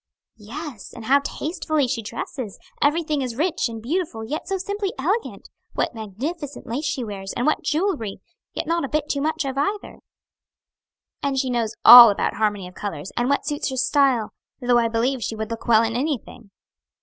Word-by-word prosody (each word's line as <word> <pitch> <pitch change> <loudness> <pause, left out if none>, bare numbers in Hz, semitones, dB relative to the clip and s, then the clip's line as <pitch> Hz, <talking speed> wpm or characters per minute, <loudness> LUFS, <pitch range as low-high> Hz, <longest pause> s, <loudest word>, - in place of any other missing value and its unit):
"Yes, 280 +7 -8
and 235 -2 -9
how 275 +4 +5
tastefully 310 0 -2
she 245 -2 -2
dresses; 230 0 -6 0.2
everything 300 0 +1
is 250 -3 -3
rich 310 -2 0
and 225 -1 -8
beautiful, 295 -5 -2
yet 300 +7 -4
so 390 - -1
simply 400 +1 -3
elegant; 455 - -2 0.3
what - - 0
magnificent 260 - -6
lace 265 +7 -3
she 265 -3 -2
wears, 195 -3 -6
and 245 - -2
what 305 - +2
jewelry; 310 - -1 0.4
yet - - -2
not 335 +1 0
a 275 - -3
bit 300 0 -1
too 280 - -1
much 315 0 -1
of 270 0 -2
either." 400 +8 -2 1.2
"And 280 -1 -1
she 260 -1 0
knows 230 -2 -1
all 240 -2 +12
about 200 - -1
harmony 205 -3 0
of 180 - -13
colors, 180 -4 -6
and 240 +2 0
what 280 - +1
suits 295 -1 -2
her 260 - -5
style; 260 -3 +2 0.3
though 245 -2 +3
I 230 - +2
believe 235 +3 0
she 220 - -3
would 220 +1 -5
look 230 - -6
well 225 -1 +5
in 225 0 -1
anything." 250 -5 -3
260 Hz, 185 wpm, -23 LUFS, 225-305 Hz, 1.2 s, all